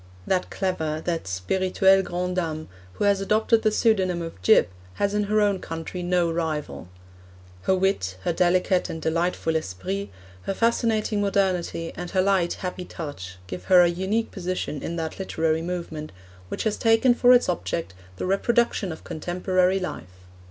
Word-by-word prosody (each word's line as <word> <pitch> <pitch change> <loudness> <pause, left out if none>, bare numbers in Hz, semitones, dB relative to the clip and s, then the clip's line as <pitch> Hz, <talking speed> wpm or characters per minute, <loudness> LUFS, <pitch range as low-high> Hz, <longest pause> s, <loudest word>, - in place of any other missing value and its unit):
That 185 -1 0
clever, 160 -5 -2
that 165 - -2
spirituelle 185 - +2
grande 180 0 -3
dame, 155 -3 -2 0.2
who - - -3
has 200 -1 +3
adopted 220 +3 +2
the 215 - +3
pseudonym 190 -6 +1
of 165 - -8
'Gyp,' 90 -1 +5 0.2
has 200 0 0
in 210 0 +1
her 215 +1 +2
own 200 -2 +2
country 165 +2 -6
no 175 -1 +1
rival. 150 - -3 0.7
Her 190 - +2
wit, 185 - 0
her - - 0
delicate 180 +1 +2
and 160 - -5
delightful 165 0 0
esprit, 100 - -3 0.4
her 195 - 0
fascinating 225 -2 +1
modernity, 185 -4 0
and 175 0 -6
her 190 0 +2
light, 190 -3 +2
happy 180 0 -5
touch, 95 - -7
give 90 0 -7
her 180 -1 +7
a 175 - +4
unique 190 +6 -1
position 180 -6 -3
in 170 - -4
that 160 +1 -4
literary 160 -4 0
movement 170 -3 -5 0.4
which - - -3
has 215 -2 0
taken 225 +2 +4
for 245 +1 +5
its 245 -1 +6
object 170 - -2 0.2
the - - -4
reproduction 200 0 +1
of 160 - -9
contemporary 180 +3 0
life. 180 - -5
180 Hz, 160 wpm, -25 LUFS, 160-195 Hz, 0.7 s, her